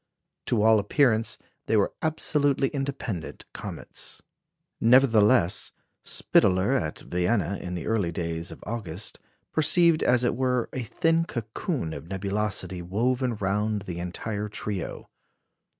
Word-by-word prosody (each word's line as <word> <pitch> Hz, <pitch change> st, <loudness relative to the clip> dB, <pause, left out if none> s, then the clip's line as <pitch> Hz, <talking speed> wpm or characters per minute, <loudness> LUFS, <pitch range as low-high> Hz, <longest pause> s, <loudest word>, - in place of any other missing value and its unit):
To 110 Hz, -4 st, +2 dB
all 110 Hz, -1 st, +6 dB
appearance 115 Hz, +1 st, +2 dB, 0.3 s
they 110 Hz, -, +3 dB
were 100 Hz, -, +2 dB
absolutely 145 Hz, -3 st, +2 dB
independent 135 Hz, -, -4 dB
comets." -, -, -7 dB, 0.6 s
Nevertheless, 115 Hz, -5 st, +4 dB, 0.3 s
Spitaler, 95 Hz, +3 st, +2 dB
at 80 Hz, -, -1 dB
Vienna, 95 Hz, +2 st, 0 dB
in 90 Hz, 0 st, -5 dB
the 85 Hz, -, -5 dB
early 105 Hz, -6 st, 0 dB
days 85 Hz, 0 st, -3 dB
of -, -, -11 dB
August, 100 Hz, -5 st, -4 dB, 0.3 s
perceived, 160 Hz, +1 st, +4 dB
as 125 Hz, 0 st, +3 dB
it 120 Hz, -, +1 dB
were, 125 Hz, -1 st, 0 dB
a 130 Hz, -, -2 dB
thin 165 Hz, +7 st, +1 dB
cocoon 115 Hz, -, -3 dB
of 80 Hz, -, -8 dB
nebulosity 95 Hz, -1 st, -2 dB
woven 120 Hz, +7 st, 0 dB
round 105 Hz, +1 st, -1 dB
the 90 Hz, -3 st, -5 dB
entire 105 Hz, +4 st, -4 dB
trio. 105 Hz, -2 st, -4 dB
110 Hz, 120 wpm, -26 LUFS, 95-130 Hz, 0.6 s, all